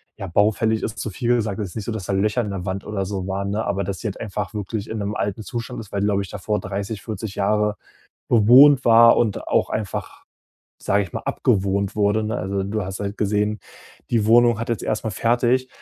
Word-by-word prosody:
ja 100 - -7
baufällig 110 +4 +1
ist, 110 - -4
zu 110 - -3
viel 120 +5 0
gesagt, 105 -4 -2
es 100 - -3
ist - - -14
nicht 110 -3 -5
so, - - -3
dass 110 -5 -5
da - - -2
Löcher 105 +5 +1
in 105 -3 -4
der 95 -1 -5
Wand 95 +1 -4
oder 105 -2 -2
so 95 -1 -4
waren, 100 +1 -2
ne, 105 +2 -2
aber 100 +3 -1
dass 100 0 -4
sie - - -11
halt 100 - -5
einfach 105 -1 -4
wirklich 105 +1 -4
in 110 - -4
'nem 100 +1 -3
alten 105 +2 -2
Zustand 120 +2 -5
ist, 110 -4 -10
weil, 100 - -2
die 100 - +1
glaube 100 -1 +1
ich 100 - -7
davor 105 +2 -2
30, 100 +2 -5
40 110 -1 -6
Jahre 105 +1 0 0.5
bewohnt 125 +5 +7
war 115 0 +7
und 110 -4 -1
auch - - +1
einfach, 105 -5 -5 0.6
sage 100 +1 +1
ich 95 - -8
mal, - - -4
abgewohnt 100 +1 0
wurde, 105 +1 +2
ne? 110 +2 -2
Also, 95 0 -2
du 105 +2 -2
hast 95 +1 -6
halt 100 0 -4
gesehen, 105 +1 0 0.5
die 115 -3 +1
Wohnung 120 0 +5
hat 115 - -4
jetzt 115 - -2
erstmal 110 +1 -2
fertig 120 +4 +1
105 Hz, 230 wpm, -22 LUFS, 100-110 Hz, 0.6 s, bewohnt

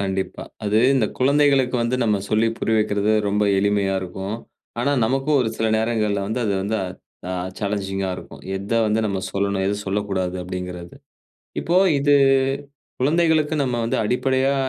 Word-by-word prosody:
கண்டிப்பா. 95 -1 -3 0.2
அது 105 +1 +2 0.2
இந்த 125 -5 +2
குழந்தைகளுக்கு 135 -1 +3
வந்து 120 +2 0
நம்ம 105 -2 +2
சொல்லி 110 +1 +3
புரிய 110 - 0
வைக்கிறது 105 0 +1 0.2
ரொம்ப 105 +1 +1
எளிமையா 100 -1 +1
இருக்கும். 95 +3 -5 0.4
ஆனா, 140 +4 +1
நமக்கும் 135 +5 +1
ஒரு 120 - +1
சில 115 - 0
நேரங்கள்ல 110 -2 0
வந்து 110 +3 -2
அது 100 - +1
வந்து 110 +3 -1 0.5
ஆ - - -2 0.3
சாலஞ்சிங்கா 95 -2 -2
இருக்கும். - - -11
எத 100 +4 -5
வந்து 105 +1 +1
நம்ம 100 -2 -2
சொல்லணும், 100 0 0
எத 100 - +1
சொல்லக்கூடாது 95 -2 -1
அப்டிங்கிறது. 90 -1 -6 0.7
இப்போ 170 - -1 0.2
இது, 145 +1 +4 0.8
குழந்தைகளுக்கு 155 +1 +2
நம்ம 125 -3 0
வந்து 115 - 0
அடிப்படையா 130 +4 +1
105 Hz, 145 wpm, -22 LUFS, 100-130 Hz, 0.8 s, இது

